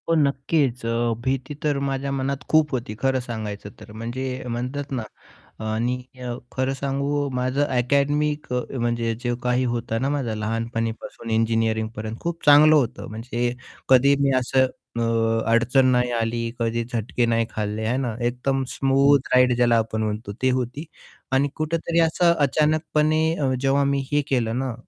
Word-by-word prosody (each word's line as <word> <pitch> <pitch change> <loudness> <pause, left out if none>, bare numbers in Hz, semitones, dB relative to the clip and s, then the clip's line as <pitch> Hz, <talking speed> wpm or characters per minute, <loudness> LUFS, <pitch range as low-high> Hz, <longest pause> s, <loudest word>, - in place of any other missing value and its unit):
हो, - - +4
नक्कीच. 140 -3 +1
अ, 115 0 0
भीती 130 +2 -2
तर 150 -2 +1
माझ्या 135 +1 -2
मनात 135 0 -2
खूप 155 -2 +4
होती 120 -3 -3
खरं 135 -1 +1
सांगायचं 110 -4 -6
तर. 105 0 -12
म्हणजे 115 +4 -5 0.3
म्हणतात 130 +5 -4
ना, 125 -4 -2 0.6
आणि 110 +3 0 0.3
अ, 120 -1 -3 0.2
खरं 130 +1 +1
सांगू 140 +1 -1
माझं 130 +3 +1
अकॅडमिक 145 +3 0
अ, 125 - +1 0.2
म्हणजे 120 -1 0
जे 120 -1 -1
काही 125 +1 +1
होतं 120 -2 -2
ना, 135 - +1
माझं 135 -6 -1
लहानपणीपासून 115 +1 -3
इंजिनिअरिंगपर्यंत 110 -1 0
खूप 170 0 -4
चांगलं 150 +2 +8
होतं 130 -4 -1
म्हणजे 120 +2 -2 0.3
कधी 135 +2 +6
मी 140 -1 +3
असं 130 +1 +2 0.3
अ, - - +1 0.5
अडचण 120 +3 +4
नाही 125 0 +2
आली, 115 0 -1
कधी 115 0 -1
झटके 120 0 -1
नाही 115 0 +1
खाल्ले 105 0 -3
आहे 115 +3 0
ना, 125 -4 -2
एकदम 125 +3 0
स्मूथ 135 +1 +3
राईड 125 -1 +5
ज्याला 120 -1 +4
आपण 110 0 -1
म्हणतो 105 -1 -3
ती 130 - +4
होती 125 +5 -5 0.5
आणि 135 +2 +3
कुठेतरी 165 +2 0
असं 170 +1 +3
अचानकपणे 155 +1 +2
अ, 135 -4 0
जेव्हा 135 +1 +2
मी 140 0 0
हे 145 - +4
केलं 120 -3 0
ना, 130 -2 -2
125 Hz, 155 wpm, -23 LUFS, 115-140 Hz, 0.6 s, चांगलं